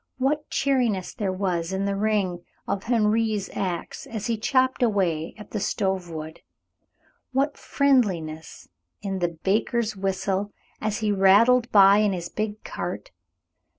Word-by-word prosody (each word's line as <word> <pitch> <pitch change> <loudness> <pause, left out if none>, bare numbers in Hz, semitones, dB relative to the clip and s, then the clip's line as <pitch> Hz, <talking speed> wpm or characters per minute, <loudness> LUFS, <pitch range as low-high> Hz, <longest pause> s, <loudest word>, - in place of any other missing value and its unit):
What 290 +4 0
cheeriness 245 -9 0
there 200 -4 -2
was 185 -3 -2
in 190 +1 -1
the 200 0 -1
ring 195 -4 0 0.2
of 195 - -2
Henri's 220 -3 +1
axe 180 -3 -4
as 220 -2 -5
he 230 - 0
chopped 255 +4 +1
away 185 -9 0
at 210 - -12
the 215 - -2
stove 190 -3 -1
wood! 160 0 -7 0.9
What 280 +2 +1
friendliness 185 - 0 0.4
in 195 -2 -2
the 170 -2 -2
baker's 220 +2 0
whistle, 195 +1 -2 0.3
as 215 0 -2
he 215 -1 +1
rattled 220 +6 +5
by 200 -1 +7
in 210 -2 +2
his 175 -1 -4
big 215 0 -4
cart! - - -5
205 Hz, 140 wpm, -25 LUFS, 190-230 Hz, 0.9 s, by